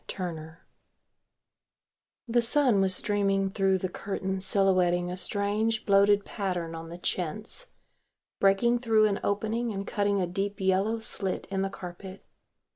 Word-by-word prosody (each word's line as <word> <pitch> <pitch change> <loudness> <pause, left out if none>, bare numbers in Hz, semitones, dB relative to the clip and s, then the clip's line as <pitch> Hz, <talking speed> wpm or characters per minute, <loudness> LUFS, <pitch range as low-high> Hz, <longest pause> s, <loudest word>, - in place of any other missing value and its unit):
TURNER_] 165 -3 -6 1.7
The 240 +1 +3
sun 240 -4 +3
was 190 -1 +2
streaming 195 -1 +1
through 195 -1 +2
the 185 - -2
curtains 190 0 -3
silhouetting 180 -3 +2
a - - -3
strange 205 +4 0
bloated 200 0 +4
pattern 180 -5 -3
on 165 0 -7
the 170 - -8
chintz, 200 - -3 0.7
breaking 235 +5 +3
through 225 -3 +3
an 200 -2 +1
opening 220 +3 -1
and 200 -1 -4
cutting 200 -1 0
a 185 - +1
deep 195 +4 -3
yellow 190 +4 +1
slit 200 -4 -3
in 190 -1 0
the 195 - -1
carpet. 190 0 -9
195 Hz, 135 wpm, -28 LUFS, 185-210 Hz, 1.7 s, bloated